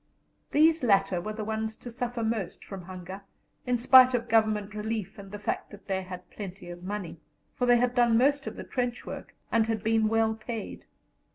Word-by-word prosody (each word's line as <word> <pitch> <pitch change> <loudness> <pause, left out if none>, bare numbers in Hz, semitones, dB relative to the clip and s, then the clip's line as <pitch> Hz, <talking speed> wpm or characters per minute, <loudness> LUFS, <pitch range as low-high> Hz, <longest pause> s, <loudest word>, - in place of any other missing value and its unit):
These 320 +2 +4
latter 195 -5 +3
were 215 +4 -4
the 215 0 -4
ones 220 0 -3
to 240 - -9
suffer 240 -1 -3
most 220 -4 -3
from 195 -2 -7
hunger, 185 +1 -8 0.5
in 250 0 +2
spite 255 +1 +7
of 235 -1 -2
Government 215 -2 +2
relief 215 -2 -4
and 195 -1 -10
the 205 - -5
fact 205 - -3
that 205 -1 -13
they 190 -1 -1
had 180 -1 -9
plenty 185 -3 -8
of 175 0 -9
money; 190 -3 -5 0.3
for 250 - -1
they 245 0 +6
had 245 +1 +1
done 240 -2 +4
most 275 +3 +2
of - - -5
the - - -7
trench 245 -1 -3
work, - - -8 0.2
and 225 -1 +3
had 220 -2 -1
been 220 -1 +3
well 225 0 +2
paid. 220 0 -6
220 Hz, 200 wpm, -28 LUFS, 195-240 Hz, 0.5 s, spite